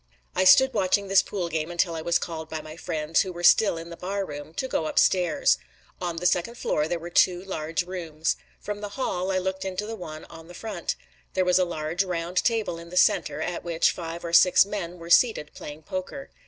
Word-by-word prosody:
I 185 - +2
stood 265 +8 +7
watching 200 -1 +1
this 195 - +6
pool 185 -4 -4
game 160 -1 -2
until 175 0 0
I 160 - -4
was 170 +1 +2
called 160 -2 -6
by 160 - -4
my 155 0 -10
friends, 160 -1 0
who 190 - -3
were 175 0 -8
still 195 0 +5
in 165 +1 -8
the - - -6
bar 195 +3 -3
room, 145 -1 -8
to 260 - -2
go 160 -10 -1
upstairs. 185 - +3 0.4
On 175 -2 -2
the 175 - -4
second 180 +6 +1
floor 150 -8 0
there 175 - -1
were 170 +1 -8
two 180 +1 +3
large 165 -2 -2
rooms. 165 -4 -2 0.2
From 205 0 -5
the 205 - -4
hall 185 -8 -1
I 190 - +1
looked 190 +1 -2
into 190 +2 -3
the 225 +1 -5
one 155 -6 -8
on 165 0 -13
the 175 - -12
front. 205 -5 -4 0.4
There 185 - +2
was 180 +1 +4
a 185 - +3
large, 165 +1 -2
round 175 -1 -4
table 220 -7 0
in 170 0 -11
the 180 - -5
center, - - +3
at 175 - -4
which 170 -1 +2
five 170 0 -6
or 170 - -5
six 180 +2 +7
men 185 -4 -5
were 170 0 -9
seated 195 -9 +4
playing 150 +1 -9
poker. 185 - -6
175 Hz, 225 wpm, -26 LUFS, 165-190 Hz, 0.4 s, stood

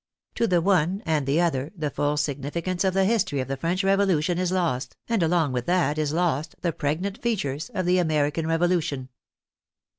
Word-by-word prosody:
To 230 - +1
the 180 -4 +3
one 190 +1 +2
and 155 -4 0
the 145 +4 +2
other 155 -5 0
the 150 -3 -2
full 145 0 0
significance 150 +5 -2
of 190 -1 +1
the 195 0 +3
history 190 -9 +1
of 130 - -2
the 135 - -2
French 170 +7 -1
Revolu 195 -5 +3
tion 175 +1 0
is 180 -1 0
lost, 160 -9 -1
and 230 -4 +1
along 165 -3 +2
with 125 -1 -3
that 170 -5 +1
is 150 -2 0
lost 160 -2 0
the 170 -3 0
pregnant 175 +9 -2
features 165 - -2
of 185 -3 -1
the 180 +1 +3
American 155 -1 0
Revolution. 165 -6 0
165 Hz, 190 wpm, -25 LUFS, 145-185 Hz, -, the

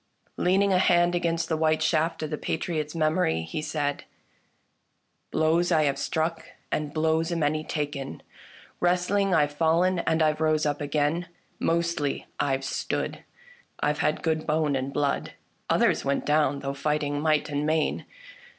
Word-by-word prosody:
Leaning 195 +2 +3
a 180 - +4
hand 175 -1 +4
against 170 -1 0
the 160 - 0
white 155 0 +2
shaft 160 +1 +1
of 155 - -4
the - - 0
Pa - - -3
triots' 155 -2 -3
memory, 155 - +1
he 80 - -4
said: 145 -2 -2 0.6
" - - -47
Blows 165 +3 +2
I 160 -2 +4
have 140 -2 0
struck, 165 0 -1 0.3
and 150 -1 -1
blows 160 +2 +1
a - - 0
many 155 -1 0
taken, 145 -4 -4 0.6
Wrestling 180 +2 +2
I've 145 -2 +3
fallen, 170 +4 +2
and 160 -1 +1
I've 155 0 +1
rose 155 -1 +2
up 145 0 -1
again; 150 +4 0 0.3
Mostly 170 -4 0
I've 135 -1 0
stood - - -3 0.3
— 485 0 -29
I've 150 0 0
had 155 - 0
good 160 -1 0
bone 150 -2 +1
and 135 +1 -2
blood; 145 0 -1 0.4
Others - - +3
went 140 0 -1
down 145 -2 +2
though 135 0 -3
fighting 145 0 -1
might 155 -1 +2
and 145 0 -1
main. 155 0 0
155 Hz, 160 wpm, -26 LUFS, 145-165 Hz, 0.6 s, a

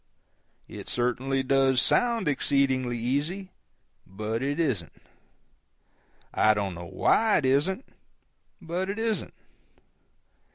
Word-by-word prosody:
It - - -9
certainly 130 +2 0
does 135 -1 +3
sound 235 - +2
exceedingly 135 -3 +1
easy; 150 +11 -2 0.6
but 110 +4 -4
it 140 +3 -2
isn't. 120 - -1 1.4
I 110 0 +4
don't 100 -2 -2
know 85 0 -8
why 220 -1 +3
it 140 - 0
isn't 155 - +1 0.7
but 180 +3 -3
it 200 - -3
isn't. 225 -1 -2
135 Hz, 100 wpm, -27 LUFS, 120-180 Hz, 1.4 s, I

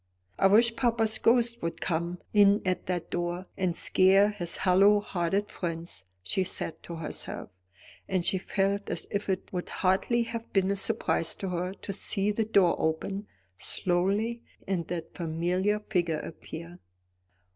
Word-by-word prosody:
"I 195 - +6
wish 230 +4 +5
papa's 225 -3 +1
ghost 235 0 +3
would 165 - -3
come 170 +1 -1 0.2
in 205 0 +5
at 185 -1 -1
that 180 -2 -3
door 175 +1 -2
and 185 -3 0
scare 195 +3 +4
his 175 -5 -2
hollow 195 +3 +5
hearted 195 +1 -1
friends," 165 - -5 0.2
she 190 - 0
said 165 -2 -3
to 170 - -7
herself; 160 -2 -5 0.6
and 185 -2 0
she 190 - +2
felt 200 +1 -1
as 170 - -2
if 200 0 -2
it 190 0 -2
would 180 -1 -3
hardly 195 +6 +1
have 230 0 -6
been 195 -1 +3
a - - +1
surprise 165 -3 +1
to 195 - -4
her 180 +2 -2
to 200 - -6
see 200 +1 0
the 220 +1 0
door 200 -5 +4
open 195 +6 -2 0.3
slowly 200 +6 0 0.3
and 180 -3 -1
that 170 -2 -5
familiar 180 +5 0
figure 175 -6 0
appear. 170 +2 -9
190 Hz, 155 wpm, -28 LUFS, 175-205 Hz, 0.6 s, I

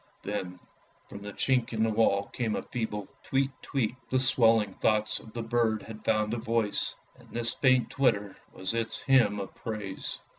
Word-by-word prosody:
Then 95 -3 -4 0.5
from 100 - -9
the 105 0 -6
chink 125 +2 +1
in 110 0 +1
the 110 - +2
wall 105 -2 +3
came 115 -3 -1
a - - -3
feeble 105 -4 -3
tweet 135 +1 +1
tweet; 125 -4 -1
the 130 - +2
swelling 115 -5 +4
thoughts 110 +1 +1
of 110 - -13
the 115 - -3
bird 115 -2 +1
had 110 -1 -10
found 110 0 +1
a - - 0
voice, 115 -2 0 0.2
and - - -18
this 120 0 -1
faint 130 -2 +3
twitter 105 -8 +1 0.2
was 95 +3 -3
its 115 -1 -2
hymn 120 -7 +4
of 95 - -6
praise. 105 -4 -4
110 Hz, 180 wpm, -29 LUFS, 105-120 Hz, 0.5 s, swelling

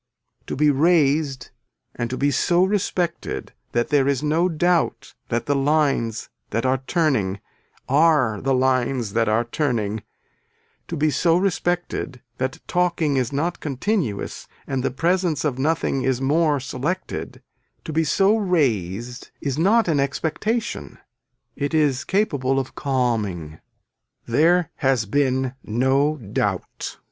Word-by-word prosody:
To - - -3
be 150 +1 +4
raised 145 -3 +2 0.4
and 120 -1 -3
to 130 - -3
be 145 +1 +2
so 175 +5 +3
respected 185 -3 -2 0.2
that 120 0 +1
there 140 -2 +3
is 140 -1 0
no 160 +4 +2
doubt 175 +1 0 0.2
that 120 - -1
the 145 - +1
lines 140 -6 +1 0.2
that 115 - -1
are 130 0 +2
turning 130 - +1 0.5
are 140 -7 +3
the 135 0 +1
lines 130 -3 +1
that 115 -1 +2
are 110 +2 +2
turning, 115 -5 -1 0.9
to 165 - -4
be 150 +1 +2
so 165 +3 +3
respected 175 -7 -1 0.2
that 130 +1 -2
talking 175 -5 +1
is 125 -1 0
not 165 +5 -1
continuous 145 - -2 0.2
and 135 -1 -2
the - - 0
presence 170 +2 0
of 130 -4 -1
nothing 150 -2 0
is 130 -1 0
more 150 +2 +2
selected, 140 +8 -4 0.4
to 160 - -5
be 160 +1 +2
so 195 +8 +3
raised 125 - -1
is 140 0 -2
not 215 +6 +4
an 155 -4 +2
expectation, 160 - -2 0.6
it 145 +2 -2
is 145 -4 +2
capable 140 -10 0
of 135 -1 -2
calming. 110 - -1 0.7
There 165 +7 +3
has 130 -4 +1
been 130 +2 0
no 135 +6 +1
doubt. 105 -7 -3
140 Hz, 135 wpm, -22 LUFS, 125-165 Hz, 0.9 s, be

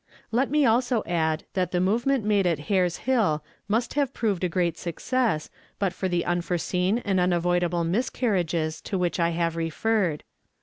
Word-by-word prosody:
"Let 250 +4 +1
me 295 0 +3
also 240 0 +2
add 160 -2 0
that 185 -2 0
the 180 - +1
movement 230 +6 +1
made 205 -3 +3
at 170 -3 +1 0.2
Hare's 180 -3 +2
Hill 210 -13 +2 0.3
mast 230 +3 0
have 280 -2 0
proved 205 -6 -1
a 180 - +1
great 170 -1 0
success 180 +1 -1 0.3
but 195 -3 0
for 190 - -2
the 175 -1 0
unforeseen 180 +3 0
and 195 -3 +1
unavoidable 175 -1 +1
miscarriages 175 -5 0
to 195 - -3
which 180 0 -1
I 170 0 +3
have 165 -1 -1
referred. 165 +1 0
180 Hz, 165 wpm, -26 LUFS, 170-225 Hz, 0.3 s, me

